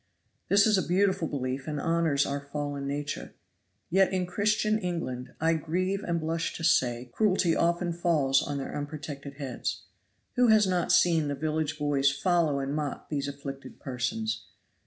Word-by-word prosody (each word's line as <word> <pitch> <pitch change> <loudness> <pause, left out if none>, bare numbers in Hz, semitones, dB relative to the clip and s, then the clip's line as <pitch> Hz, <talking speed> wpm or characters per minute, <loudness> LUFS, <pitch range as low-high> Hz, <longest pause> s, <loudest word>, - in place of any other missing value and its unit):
This 200 0 +6
is 215 -3 +4
a - - -3
beautiful 185 -1 +2
belief 130 -1 -3
and 150 -1 -2
honors 165 -4 +2
our 140 +1 -2
fallen 140 0 -4
nature. 145 +1 -4 0.6
Yet 190 +1 +4
in 185 -1 0
Christian 215 +3 +1
England, 130 - -4
I 165 +1 +3
grieve 185 +5 -1
and 170 -1 -1
blush 165 +1 -2
to 165 - -6
say, 125 -4 +2
cruelty 190 -5 +2
often 170 +1 +1
falls 155 -6 +2
on 145 -1 -3
their 135 - -5
unprotected 145 -1 -6
heads. 135 -3 -4 0.5
Who 250 0 +5
has 215 -2 +6
not 180 -2 +1
seen 165 -4 +4
the 145 - -1
village 155 +1 -1
boys 145 -2 +2
follow 160 +1 +1
and 140 +1 -2
mock 150 -2 -4
these 140 -2 -2
afflicted 140 -1 -7
persons? 110 -5 -3
155 Hz, 160 wpm, -28 LUFS, 140-175 Hz, 0.6 s, This